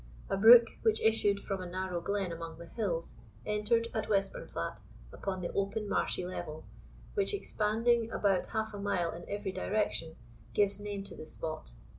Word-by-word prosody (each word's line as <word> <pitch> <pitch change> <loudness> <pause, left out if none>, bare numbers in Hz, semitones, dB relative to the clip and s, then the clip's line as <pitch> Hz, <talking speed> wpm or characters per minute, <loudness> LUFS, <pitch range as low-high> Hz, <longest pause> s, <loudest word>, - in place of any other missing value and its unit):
A - - +3
brook, 230 +4 +10 0.2
which 445 -1 +3
issued 205 -2 +3
from 195 -2 -3
a 180 - -5
narrow 185 -1 -2
glen 200 -2 -1
among 165 -1 -6
the 170 - -9
hills, 170 -3 -3 0.3
entered, 215 +2 +1
at 220 -1 -2
Westburnflat, 195 -2 -1 0.3
upon 190 -2 -3
the 175 - -3
open 200 +2 -1
marshy 185 - 0
level, 160 -4 -6 0.5
which, 405 0 +1
expanding 230 - +1
about 195 -4 +1
half 220 0 -2
a 205 - -6
mile 180 -4 0
in 170 +1 -9
every 205 -1 -2
direction, 185 -5 -1 0.4
gives 200 -1 +3
name 205 -1 -4
to - - -10
the 155 - -9
spot. 155 - -5
200 Hz, 165 wpm, -32 LUFS, 180-220 Hz, 0.5 s, brook